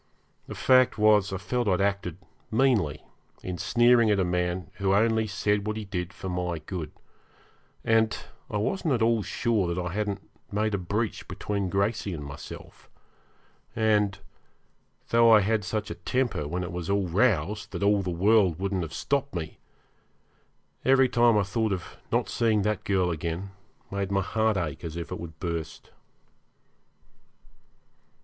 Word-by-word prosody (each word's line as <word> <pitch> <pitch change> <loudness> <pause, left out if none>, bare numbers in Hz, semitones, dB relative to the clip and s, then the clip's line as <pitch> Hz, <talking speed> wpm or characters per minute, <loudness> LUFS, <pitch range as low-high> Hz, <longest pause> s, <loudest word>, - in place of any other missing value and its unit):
The - - -7
fact 130 -1 +4
was, 105 -2 +4
I 95 - -2
felt 120 +4 -2
I - - +3
had 90 - 0
acted 100 -4 -1 0.3
meanly 110 - +2 0.4
in 90 -2 -5
sneering 120 -1 +4
at 105 -1 +3
a - - +3
man 90 0 -1
who 100 -1 +2
only 110 +1 +2
said 105 +1 0
what 110 0 -2
he 110 - -5
did 90 -2 -4
for 95 - -8
my 90 -2 -2
good; 80 +1 -6 0.9
and 110 -1 +3 0.3
I 105 - -2
wasn't 155 - 0
at 115 - 0
all 115 -1 +3
sure 100 -2 0
that 85 - -2
I 90 -1 -3
hadn't 105 -1 -3 0.2
made 105 +1 0
a 100 - 0
breach 105 +5 -2
between 100 -2 -3
Gracey 100 0 -1
and 75 -2 -7
myself, 70 +1 -10 0.9
and, 105 -2 +2 0.9
though 115 0 +5
I 110 -1 +8
had 110 +1 +1
such 105 +3 -3
a - - -8
temper 125 - -1
when 90 +4 -2
it 90 - -5
was 85 0 -5
roused 100 0 +1
that - - -4
all 100 0 +4
the 95 - -3
world 95 -1 +3
wouldn't 95 0 -1
have 80 -3 -5
stopped 140 -3 -1
me, 80 -2 -5 1.2
every 130 -1 +5
time 120 -2 +4
I 105 - +3
thought 110 +2 -1
of 90 -2 -6
not - - +1
seeing 110 -3 +1
that 105 -2 -1
girl 95 -3 +1
again 85 +4 -4 0.4
made 100 -1 -2
my 100 0 +1
heart 110 +1 +1
ache 80 -4 -3
as 85 0 -5
if 85 -1 -6
it - - -4
would 80 -2 -9
burst. 85 -2 -5
100 Hz, 165 wpm, -27 LUFS, 90-110 Hz, 1.2 s, I